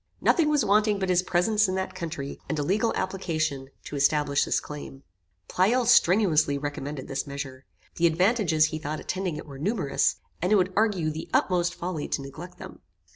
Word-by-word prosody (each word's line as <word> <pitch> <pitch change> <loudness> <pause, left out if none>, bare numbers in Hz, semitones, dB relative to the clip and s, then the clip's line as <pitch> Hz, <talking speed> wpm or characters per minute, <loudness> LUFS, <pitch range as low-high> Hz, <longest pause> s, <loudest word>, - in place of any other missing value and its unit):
Nothing 325 -4 +3
was 295 -6 +2
wanting 210 +1 +3
but 190 -1 -2
his 180 -1 +4
presence 200 +4 +2
in 185 - -2
that 190 0 -3
country, 155 -5 -5
and 160 - -1
a 145 - 0
legal 210 +8 +1
application 155 -8 -2
to - - -7
establish 145 0 +2
this - - +1
claim. 145 -2 -9 0.4
Pleyel 235 +7 +2
strenuously 180 -10 +4
recommended 145 -1 -5
this 135 +1 -3
measure. 135 -2 -7 0.3
The 170 - +4
advantages 170 -2 +3
he 155 - -2
thought 155 0 -4
attending 185 -4 -3
it - - -7
were 140 -3 -10
numerous, 185 -3 +1 0.3
and 180 +4 0
it - - +6
would 185 -1 +2
argue 200 -7 +1
the 155 +1 -7
utmost 175 -1 +1
folly 170 -4 -4
to 140 - -2
neglect 165 +6 -10
them. - - -10
170 Hz, 180 wpm, -26 LUFS, 145-195 Hz, 0.4 s, it